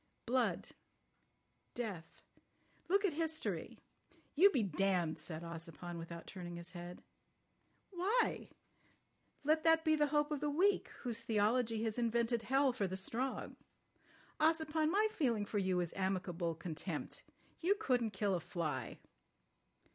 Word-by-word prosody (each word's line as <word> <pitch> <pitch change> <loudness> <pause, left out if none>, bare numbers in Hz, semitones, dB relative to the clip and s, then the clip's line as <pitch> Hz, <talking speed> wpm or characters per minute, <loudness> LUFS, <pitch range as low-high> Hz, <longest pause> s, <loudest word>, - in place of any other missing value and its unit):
Blood. 250 +1 +1 1.1
Death. 195 -9 -5 0.7
Look 400 +2 +4
at 380 - +1
history." 320 0 -2 0.6
"You 375 +7 +7
be 260 - +1
damned," 180 -3 +1
said 155 +1 -5
Ossipon, 170 +1 -6
without 165 0 -7
turning 175 -2 -7
his 170 0 -8
head. 175 -1 -8 0.9
"Why? 400 +7 +1 0.9
Let 310 +2 +3
that 325 0 +5
be 315 0 +5
the 300 -1 +3
hope 295 +1 +1
of 295 - 0
the 295 +1 0
weak, 375 +8 +3 0.2
whose 235 -3 -2
theology 225 +1 +1
has 225 +1 -1
invented 235 0 +1
hell 270 +2 +3
for 205 -6 0
the 190 +1 -3
strong. 245 +7 -2 0.8
Ossipon, 315 0 +2
my 415 +5 +3
feeling 235 - +1
for 205 0 -1
you 185 -2 +1
is 175 - -3
amicable 180 -3 -1
contempt. 165 -1 -4 0.4
You 375 +4 +3
couldn't 250 - +1
kill 205 -1 0
a 180 - +1
fly." 155 -8 -3
230 Hz, 130 wpm, -36 LUFS, -, 1.1 s, You